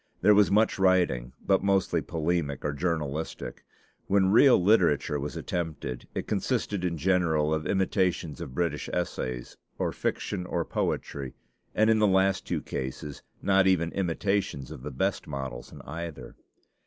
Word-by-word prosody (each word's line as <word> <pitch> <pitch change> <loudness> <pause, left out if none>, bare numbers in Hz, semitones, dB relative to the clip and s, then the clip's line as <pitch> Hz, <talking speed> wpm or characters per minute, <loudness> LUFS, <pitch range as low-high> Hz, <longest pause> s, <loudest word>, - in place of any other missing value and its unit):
There 105 - +6
was 105 0 +5
much 105 0 +3
writing, 90 -11 +2
but 95 -1 +3
mostly 95 -4 +2
polemic 80 -4 -2
or 75 - 0
journalistic. 80 -1 -3 0.4
When 95 -1 +3
real 125 +2 +7
literature 85 -7 +3
was 75 +1 -4
attempted, 80 -8 -4
it - - -2
consisted 100 -3 -1
in 85 -2 -1
general 80 -3 +2
of 80 -1 -1
imitations 95 -6 0
of 65 - -7
British 85 -3 -1
essays, 65 -8 -3 0.2
or - - 0
fiction, 90 -3 -3
or 85 -2 -1
poetry; 70 -3 -3 0.4
and 110 - +4
in 110 -1 +4
the 105 - +4
last 95 0 +2
two - - -2
cases 65 +2 -5 0.2
not 95 -1 +4
even 85 -3 +2
imitations 95 -6 -1
of - - -8
the 75 - -5
best 65 - -1
models 65 -4 -6
in - - -11
either. 85 -1 -7
85 Hz, 150 wpm, -28 LUFS, 75-95 Hz, 0.4 s, real